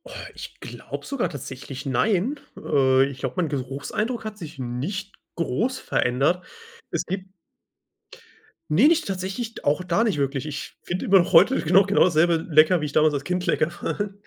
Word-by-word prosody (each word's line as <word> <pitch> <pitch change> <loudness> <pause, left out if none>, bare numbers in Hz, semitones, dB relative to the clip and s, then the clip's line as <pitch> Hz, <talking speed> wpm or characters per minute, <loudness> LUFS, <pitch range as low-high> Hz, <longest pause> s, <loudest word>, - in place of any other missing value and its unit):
Oh, - - -12 0.2
ich - - -10
glaube - - -8
sogar 275 -3 -1
tatsächlich 135 0 -8
nein, 200 - +1 0.2
äh, 135 -2 +3
ich 135 -1 -7
glaube, 130 -1 -4
mein 170 -4 +1
Geruchseindruck 140 - -3
hat 215 -1 -5
sich 165 -9 -9
nicht 145 - -4 0.2
groß 210 - -1
verändert. 140 - 0 0.5
Es - - -1
gibt 190 0 -5 1.4
Ne, 215 - +6
nicht 330 0 +3
tatsächlich, 195 +5 -4
auch 150 +5 +2
da 180 +6 +1
nicht 205 -9 0
wirklich. 140 0 -1
Ich 145 -1 -6
finde 180 +1 -3
immer 195 0 +6
noch 175 - 0
heute 195 +11 +6
genau 185 +5 +5
genau 200 +2 +4
dasselbe 170 -1 +3
lecker, 155 +3 +5
wie 150 - -2
ich 145 - -5
damals 155 0 +4
als 140 -1 -3
Kind 180 0 -1
lecker 170 -2 +1
fand., 205 +3 -4
170 Hz, 170 wpm, -24 LUFS, 140-200 Hz, 1.4 s, Ne